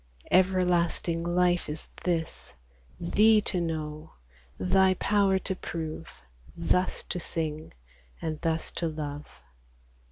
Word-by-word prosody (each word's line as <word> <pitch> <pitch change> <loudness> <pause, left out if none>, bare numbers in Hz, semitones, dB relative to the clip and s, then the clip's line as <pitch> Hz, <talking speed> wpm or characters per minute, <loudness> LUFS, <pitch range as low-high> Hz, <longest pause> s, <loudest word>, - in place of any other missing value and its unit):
Everlasting 180 -2 +2
life 175 0 +2
is 150 +1 -3 0.2
this, 165 -2 -2 0.5
Thee 215 +1 +5
to 185 -3 0
know, 155 -2 -4 0.5
Thy 185 - +4
power 200 0 +3
to 190 0 -2
prove, 165 -2 -5 0.5
Thus 180 +2 +1
to 180 - -3
sing, 155 -2 -4 0.5
and 155 -2 -4
thus 165 -1 -1
to 170 - -2
love 150 -2 -5
170 Hz, 105 wpm, -28 LUFS, 160-185 Hz, 0.5 s, Thee